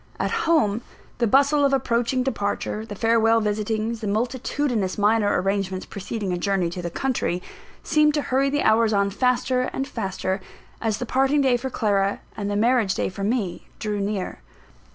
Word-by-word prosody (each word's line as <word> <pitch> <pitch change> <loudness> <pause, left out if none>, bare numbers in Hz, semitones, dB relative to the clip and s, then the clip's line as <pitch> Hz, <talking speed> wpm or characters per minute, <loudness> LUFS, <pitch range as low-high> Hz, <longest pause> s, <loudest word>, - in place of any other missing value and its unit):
At - - 0 0.2
home, 220 -9 +3 0.4
the 235 - +3
bustle 280 +5 +4
of 275 -1 +3
approaching 250 0 +1
departure; 220 -2 -2
the 205 - -6
farewell 225 +1 +3
visitings; 215 +1 -1
the 215 - -3
multitudinous 235 -1 -1
minor 210 -1 +3
arrangements 190 0 -1
preceding 200 -1 -4
a 175 - -2
journey 190 -3 0
to 180 - -5
the 175 - -3
country, 235 -4 -1 0.4
seemed 300 -1 +3
to 295 - 0
hurry 270 +2 +1
the 290 +1 0
hours 220 0 +4
on 200 0 +2
faster 255 +2 +1
and 270 - -2
faster, 190 -3 -3 0.4
as 220 -2 0
the 245 - -4
parting 270 +4 +2
day 260 -3 +3
for 255 +2 -3
Clara, 200 -4 0 0.2
and 205 -1 -3
the 205 - -1
marriage 225 -2 +2
day - - -1
for 195 +1 -6
me, 205 -4 -2
drew 210 -1 -2
near. 200 -1 -3
220 Hz, 175 wpm, -24 LUFS, 200-255 Hz, 0.4 s, bustle